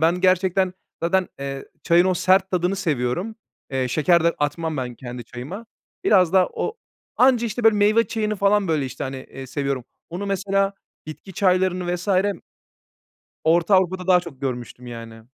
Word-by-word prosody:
Ben 170 +3 +2
gerçekten 185 0 +2 0.3
zaten, 185 +2 +1
eee, 135 0 -5 0.2
çayın 170 +1 +4
o 185 -1 +2
sert 190 +2 +3
tadını 180 +1 0
seviyorum. 170 - -1 0.4
Eee, 130 -1 -1
şeker 165 +4 +3
de 170 - +3
atmam 155 +2 -2
ben 125 -2 -4
kendi 120 -1 -8
çayıma. 160 - -8 0.4
Biraz 185 -5 +4
da 185 -1 +5
o 450 - -3 0.4
anca, 250 -2 +4
işte, 230 +2 -4
böyle 220 -1 +6
meyve 210 +3 +4
çayını 215 -1 -2
falan 200 0 +2
böyle, 155 -4 +1
işte, 130 0 -6
hani, 135 0 -5
eee, 130 0 -9
seviyorum. 135 -1 -2 0.3
Onu, 185 +4 -4
mesela 195 0 0 0.3
bitki 155 +5 -9
çaylarını 180 -1 +1
vs. 180 +3 -6 1.4
Orta 170 +4 +4
Avrupa'da 185 0 +1
daha 180 -1 +5
çok 160 -7 -11
görmüştüm 125 -1 -5
yani. 115 -1 -9
180 Hz, 160 wpm, -22 LUFS, 140-195 Hz, 1.4 s, böyle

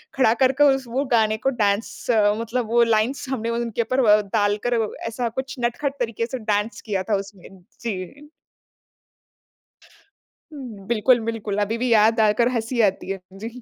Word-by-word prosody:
खड़ा 245 -4 +4
करके 265 +3 +3 0.3
वो 270 +4 -1
गाने 220 -1 +2
को - - +6
डांस 200 +2 -1 0.3
मतलब 230 0 -2
वो 235 0 +5
लाइन्स 230 +5 0
हमने 230 -3 -2
उनके 235 0 -2
ऊपर 255 +3 0
व 210 0 +6
डालकर 210 +3 +1 0.3
ऐसा 235 +1 -2
कुछ 265 0 -5
नटखट 275 +4 -2
तरीके 230 -1 -2
से 255 +1 -5
डांस 210 +3 -2
किया 195 -4 -2
था 205 - +3
उसमें। 195 -2 -15 0.3
जी। 235 - -6 2.6
बिल्कुल, 235 +2 +4
बिल्कुल, 215 -3 -3
अभी 220 +3 -1
भी 250 - 0
याद 220 +1 +4
आकर 220 +2 +3
हँसी 230 +1 -1
आती 195 -2 0
है, 195 - -4
जी। 230 +5 -8
230 Hz, 150 wpm, -22 LUFS, 210-245 Hz, 2.6 s, को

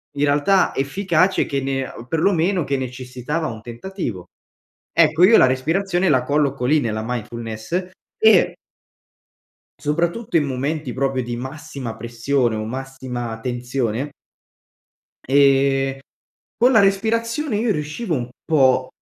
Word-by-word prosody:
in 145 - +1
realtà 145 +7 +3
efficace 180 +5 +1
che 140 -1 -2
ne 135 -1 -2 0.2
perlomeno 175 +2 +1
che 140 - 0
necessitava 130 +4 -4
un 110 -1 -7
tentativo. 120 - -6 0.7
Ecco, 160 +1 +4
io 225 +4 +7
la - - +7
respirazione 175 +8 0
la 130 -3 +3
colloco 140 -2 0
lì, 150 +4 +4
nella 110 -2 -2
mindfulness, 120 - -4 0.3
e 220 -5 +5 1.2
soprattutto 170 +7 0
in 150 - +2
momenti, 140 +1 -3
proprio, 135 -1 -1
di 120 0 -4
massima 135 -2 -6
pressione, 120 +1 -1
o 110 0 -3
massima 125 -2 -5
tensione, 125 +2 -2 1.2
ehm, 135 0 +3 0.6
con 245 +3 +5
la 220 - +6
respirazione 225 +6 +1
io 225 +2 0
riuscivo 155 +5 -3
un 120 -2 -4 0.2
po' 130 -4 +3
140 Hz, 120 wpm, -21 LUFS, 125-170 Hz, 1.2 s, io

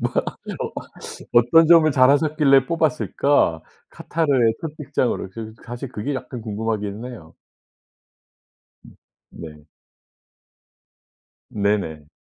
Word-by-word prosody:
뭐 - - -1 0.3
어 - - -6 0.6
어떤 120 +8 +5
점을 165 -2 +6
잘 130 -1 +5
하셨길래 145 -2 +3
뽑았을까? 145 - +1 0.3
카타르의 135 -8 +1
첫 160 - -4
직장으로.' 130 -8 -2 0.4
사실 120 +2 -7
그게 130 +5 -3
약간 125 -2 -7
궁금하기는 110 +1 -4
해요. 80 -10 -13 1.5
음 - - -16 0.4
네. 75 -3 -11 1.8
네네. 100 -8 -2
125 Hz, 200 characters per minute, -22 LUFS, 105-145 Hz, 1.8 s, 점을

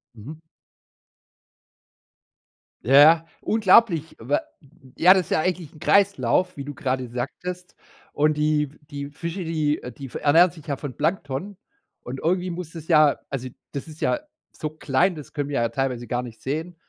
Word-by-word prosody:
Mhm. 125 +9 -9 2.5
Ja, 130 - 0
ja, 160 +3 +7 0.2
unglaublich, 195 -6 +3
wa 130 +6 0 0.5
Ja, 180 +3 +7
das 190 -2 +2
ist - - -16
ja - - +3
eigentlich 180 -2 -2
'n 155 - -15
Kreislauf, 195 -1 +2
wie 140 - -5
du 145 +1 -7
grade 130 -2 -2
sagtest. 180 +9 -6 0.4
Und 150 +1 +2
die 150 -1 +1 0.2
die 140 -1 -6
Fische, 170 +5 -5
die 155 -2 -1 0.2
die 135 -2 -8
ernähren 165 +5 +5
sich 160 -3 -15
ja 140 -2 -2
von 140 -5 -7
Plankton. 165 +3 -2 0.4
Und 130 +2 -7
irgendwie 180 +2 0
muss 170 -2 -6
das 160 -2 -10
ja 155 -4 +5
also, 130 -2 -4 0.2
das 140 +3 -6
ist 155 0 -12
ja 300 - +1 0.3
so 155 - -5
klein, 155 +4 +1
das 150 - -11
können 145 -1 -3
wir 140 - -3
ja 115 - +1
teilweise 125 -1 -2
gar 120 -1 -1
nicht 115 -3 -11
sehen. 160 +6 -4
155 Hz, 165 wpm, -24 LUFS, 140-175 Hz, 2.5 s, ja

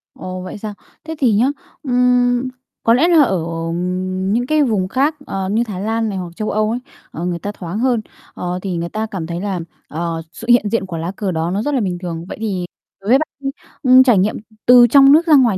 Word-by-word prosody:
Ồ, 185 0 -6
vậy 185 +3 -7
sao? 210 0 -6 0.3
Thế 320 0 -6
thì 245 -6 +3
nhá, 215 +4 +3 0.4
ừm, 250 -1 +2 0.4
có 230 - +5
lẽ 275 +8 +4
là 335 -4 +6
ở 190 -9 +1 0.9
những 245 +2 0
cái 310 0 +3
vùng 210 -8 0
khác, 275 +9 +1
ờ, 190 -1 -3
như 220 +4 +1
Thái 205 -5 -6
Lan 225 +1 -1
này 195 - -4
hoặc 180 -2 -5
châu 215 +3 -3
Âu 215 0 +1
ấy, 240 - -2 0.3
ờ, 170 - -5
người 175 -1 -2
ta 205 - -4
thoáng 185 0 -6
hơn, 245 -2 +1 0.3
ờ, 180 0 -4
thì 185 -3 -3
người 170 0 -3
ta 215 +3 -2
cảm 190 -7 -5
thấy 170 +1 -4
là, 195 -3 -2 0.3
ờ, 165 +1 -3
sự 230 - -10
hiện 240 -3 +5
diện 230 -2 0
của 175 -3 -6
lá 165 +2 -3
cờ 195 -2 -2
đó 165 0 -1
nó 195 +3 -1
rất 290 +5 -1
là 260 - +1
bình 185 -4 -2
thường. 170 -2 -5
Vậy - - -7
thì 190 -5 -2 0.4
đối 200 - -5
với 255 - +7
bạn 310 - -1
đi, 275 -1 -3 0.3
ừm, 255 0 +7
trải 245 -5 +4
nghiệm, 195 +3 +2
ừ, - - -7 0.2
từ 245 -1 +8
trong 275 +3 +7
nước 325 +4 +5
ra 305 - +7
ngoài 235 -8 +4
215 Hz, 245 wpm, -18 LUFS, 185-250 Hz, 0.9 s, từ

